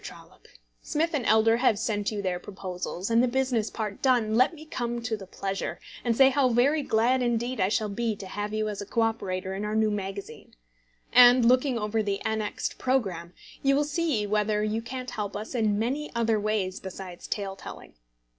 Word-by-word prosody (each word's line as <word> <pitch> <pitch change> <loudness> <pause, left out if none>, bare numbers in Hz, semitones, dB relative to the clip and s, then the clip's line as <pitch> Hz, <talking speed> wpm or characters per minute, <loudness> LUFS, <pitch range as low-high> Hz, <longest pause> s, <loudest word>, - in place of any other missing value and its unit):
TROLLOPE, - - -12 0.3
Smith 325 +3 -1
& - - -17
Elder 220 +1 +4
have 240 -4 +3
sent 205 -1 -1
you 205 -2 -4
their 180 -2 -1
proposals; 185 0 -5
and 230 +1 +5
the 250 - +3
business 250 -3 0
part 210 -3 -5
done, 240 -5 +2
let 255 +5 +5
me 310 0 -12
come 240 -5 -3
to 230 -2 -1
the 195 -3 -10
pleasure, 195 +1 -4 0.2
and 235 -2 0
say 270 -1 +7
how 270 -1 +2
very 265 +6 +3
glad 250 0 +2
indeed 240 0 -1
I 185 - +2
shall 215 +1 0
be 225 +2 -2
to 200 - -9
have 205 +2 -4
you 215 0 -1
as 205 -1 -4
a 205 - -7
co 230 - 0
operator 190 -4 -1
in 195 +2 -4
our 210 +1 -2
new 220 -1 +2
magazine. 195 - -6 0.6
And 245 0 +8
looking 255 +1 +3
over 215 0 0
the 200 -2 -1
annexed 220 -1 -3
programme, 190 -10 -1 0.3
you 275 0 +3
will 290 - +3
see 295 -7 0
whether 210 0 +1
you 215 +1 -1
can't 250 +2 -6
help 210 -3 -4
us 215 +4 -5
in 215 -4 +1
many 265 +7 -1
other 225 -2 +2
ways 205 -3 -1
besides 190 -2 -8
tale 195 -2 -3
telling. - - -10
220 Hz, 200 wpm, -27 LUFS, 205-245 Hz, 0.6 s, And